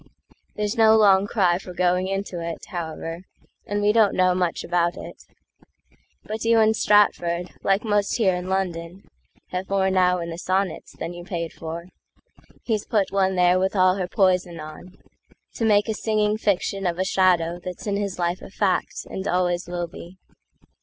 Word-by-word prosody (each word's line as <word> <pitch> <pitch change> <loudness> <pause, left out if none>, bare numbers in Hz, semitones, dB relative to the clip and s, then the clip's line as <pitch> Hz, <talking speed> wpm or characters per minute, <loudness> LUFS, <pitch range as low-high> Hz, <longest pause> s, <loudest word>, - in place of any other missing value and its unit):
There's 210 +1 -2
no 220 0 +7
long 200 -2 +5
cry 185 -5 +2
for 180 -2 -10
going 180 +1 +1
into 195 -2 -3
it, 165 -1 -6
However, 165 -1 -5 0.5
and 205 0 -1
we 205 - +4
don't 215 -2 +3
know 185 -1 +3
much 180 -2 -1
about 175 0 0
it. - - -10 1.0
But 215 +1 -5
you 230 0 +4
in 220 0 +4
Stratford, 180 -5 +2
like 195 +1 +1
most 205 -2 +1
here 200 -6 +2
in 180 +1 -4
London, 180 -1 -3 0.5
Have 185 +1 -4
more 190 -1 +1
now 180 -1 +3
in 170 -1 -5
the 165 - -6
Sonnets 190 +1 -2
than 170 - -5
you 175 0 -9
paid 170 -2 -4
for; 170 +2 -7 0.7
He's 215 -3 -2
put 205 -4 +1
one 190 -1 +1
there 180 0 +4
with 190 +2 0
all 185 0 +4
her 185 -2 -2
poison 180 -3 +1
on, 155 +4 -11 0.6
To 230 - 0
make 210 -1 +3
a 220 - 0
singing 215 -1 0
fiction 195 -2 -1
of 170 -1 -2
a 185 - +1
shadowThat's 180 -1 0
in 205 -2 -1
his 200 -2 -3
life 175 0 -1
a - - -10
fact, 195 -1 -1
and 190 - -5
always 175 0 0
will 175 0 -3
be. 170 +2 -12
185 Hz, 175 wpm, -23 LUFS, 175-200 Hz, 1.0 s, no